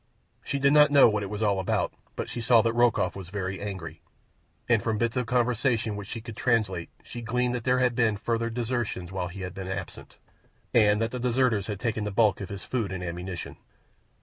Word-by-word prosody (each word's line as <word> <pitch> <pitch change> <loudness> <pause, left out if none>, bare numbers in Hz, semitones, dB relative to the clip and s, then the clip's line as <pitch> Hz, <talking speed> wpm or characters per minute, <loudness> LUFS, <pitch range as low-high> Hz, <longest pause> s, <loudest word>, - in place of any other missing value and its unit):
She 140 - -2
did 140 +1 +3
not 150 0 +7
know 145 -1 +7
what 105 -2 0
it 100 - -4
was 105 +2 -3
all 100 -2 +2
about, 95 - 0 0.2
but - - -3
she 120 - -5
saw 115 -1 +5
that 115 - +1
Rokoff 120 -6 +2
was 95 -3 -8
very 95 -1 -4
angry, 85 -6 -6 0.7
and 115 -4 +3
from 110 +1 -1
bits 115 +2 0
of 125 -3 -1
conversation 120 -2 +1
which 100 -1 -7
she 115 - -6
could 115 -1 -9
translate 105 -9 0
she 120 - -8
gleaned 125 +2 0
that 120 -2 -4
there 125 0 +3
had 125 -1 +2
been 115 -3 +2
further 115 +2 -1
desertions 115 -6 -3
while 95 -2 -2
he 95 +2 -8
had 90 -1 -5
been 95 -1 -6
absent, 95 0 -7 0.6
and 105 -2 +5
that 115 - -2
the 125 - -4
deserters 125 -4 +1
had 105 -2 -4
taken 110 -2 -1
the 105 - -2
bulk 105 0 +2
of 95 - -6
his 100 -2 -7
food 115 -7 -2
and 95 -1 -4
ammunition. 90 +1 -5
110 Hz, 220 wpm, -27 LUFS, 95-120 Hz, 0.7 s, not